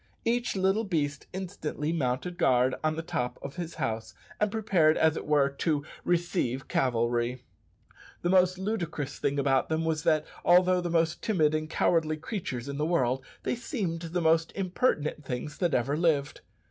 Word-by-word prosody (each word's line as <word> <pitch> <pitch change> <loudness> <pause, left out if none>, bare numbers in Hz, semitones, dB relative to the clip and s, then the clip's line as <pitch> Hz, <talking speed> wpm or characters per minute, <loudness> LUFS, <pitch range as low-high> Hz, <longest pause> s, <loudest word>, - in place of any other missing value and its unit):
Each 235 -1 0
little 195 +3 +2
beast 145 -8 -2
instantly 170 -5 -3
mounted 160 +4 -2
guard 125 0 +3
on 155 0 +1
the 165 - -4
top 125 -7 -2
of 140 - -7
his 170 -2 -5
house, 110 -2 -3 0.2
and 210 - +2
prepared, 185 -8 +3
as 160 0 +3
it - - -5
were, 145 -2 +4
"to 145 +1 -1 0.2
receive 170 -7 0
cavalry." 120 0 0 0.8
The 175 - +2
most 185 -1 +4
ludicrous 170 -8 -3
thing 140 +1 0
about 135 -1 +2
them 160 +1 0
was 160 -1 0
that, 155 -1 +2 0.2
although 180 +1 +5
the 175 - -3
most 165 0 +1
timid 160 -8 +2
and 155 0 -2
cowardly 160 -2 +1
creatures 150 - -5
in 140 0 -4
the - - +1
world, 130 -6 +1 0.2
they - - 0
seemed 205 - -3
the 175 +1 -2
most 165 0 +3
impertinent 180 - 0
things 130 +3 -5
that 175 -5 +1
ever 130 +4 +1
lived! 150 -4 +1
160 Hz, 170 wpm, -28 LUFS, 140-180 Hz, 0.8 s, although